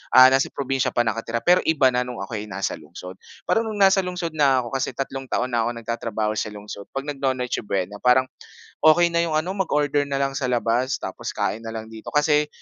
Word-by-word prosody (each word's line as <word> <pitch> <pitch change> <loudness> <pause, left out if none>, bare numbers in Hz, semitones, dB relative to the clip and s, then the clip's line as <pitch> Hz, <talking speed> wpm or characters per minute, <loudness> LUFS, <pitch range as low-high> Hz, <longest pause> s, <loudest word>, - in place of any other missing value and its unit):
ah, 130 0 +10
nasa 135 0 +3
probinsiya 135 -1 -2
pa 120 - +3
nakatira 115 0 -2
pero 180 +1 +5
iba 140 -5 +4
na 125 0 -1
no'ng 125 -5 -5
ako'y 105 +1 -5
nasa 95 -1 -3
lungsod. 90 +4 -11 0.2
Para - - +2
no'ng 220 -1 -3
nasa 195 -1 +5
lungsod 180 -2 -3
na 140 -4 +3
ako, 120 - -8
kasi 135 -1 -2
tatlong 135 -1 -4
taon 125 0 -1
na 115 -1 +1
ako 120 - -3
nagtatrabaho 110 -2 -2
sa - - -2
lungsod, 105 -1 -9
'pag 135 - -2
nagno-Noche 130 -3 -1
Buena 100 +1 -2
parang 125 +1 +4 0.6
okey 170 +2 +6
na 170 - +1
yung 165 -2 -1
ano 160 +4 0
mag-order 150 -6 +1
na 140 - -2
lang 135 0 0
sa 135 -2 -1
labas 120 +1 +1
tapos - - -5
kain 110 - -1
na 115 - -6
lang 110 0 -7
dito 110 -1 -11
kasi, 150 0 +3
130 Hz, 215 wpm, -23 LUFS, 115-150 Hz, 0.6 s, ah